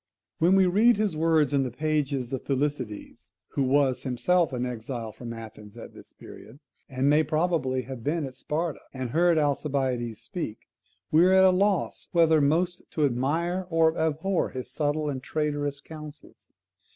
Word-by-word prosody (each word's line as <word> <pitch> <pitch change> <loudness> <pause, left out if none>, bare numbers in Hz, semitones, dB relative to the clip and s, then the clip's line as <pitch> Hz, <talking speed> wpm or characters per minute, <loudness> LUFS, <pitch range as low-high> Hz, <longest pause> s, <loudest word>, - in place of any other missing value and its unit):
When 175 +4 +4
we 190 -1 +5
read 210 +6 +4
his 210 -5 0
words 155 -3 +2
in 140 - +3
the 130 - -1
pages 140 -2 -2
of 130 - -3
Thucydides 135 -6 -4 0.2
(who - - -2
was 135 -1 +2
himself 165 +7 +1
an 125 -1 -2
exile 120 -1 -5
from 115 +2 -8
Athens 110 -1 -10
at 115 - -10
this - - -14
period, 120 +6 -13 0.3
and 130 0 0
may 150 +2 +5
probably 155 -4 0
have 130 -3 -8
been 155 +2 -1
at 130 - -7
Sparta, 160 +3 -3 0.2
and 130 -2 -4
heard 170 +2 +3
Alcibiades 135 -6 -1
speak), 165 - -5 0.5
we 160 +2 +6
are 190 - +4
at 190 0 +6
loss 195 0 0
whether 160 -2 +4
most 175 +5 +1
to 150 - +1
admire 165 +8 -1
or 165 -1 +3
abhor 160 +4 0
his 130 -1 -7
subtile 150 +1 -1
and 135 -3 -3
traitorous 145 -1 -2
counsels. 155 -2 -12
145 Hz, 165 wpm, -26 LUFS, 130-165 Hz, 0.5 s, we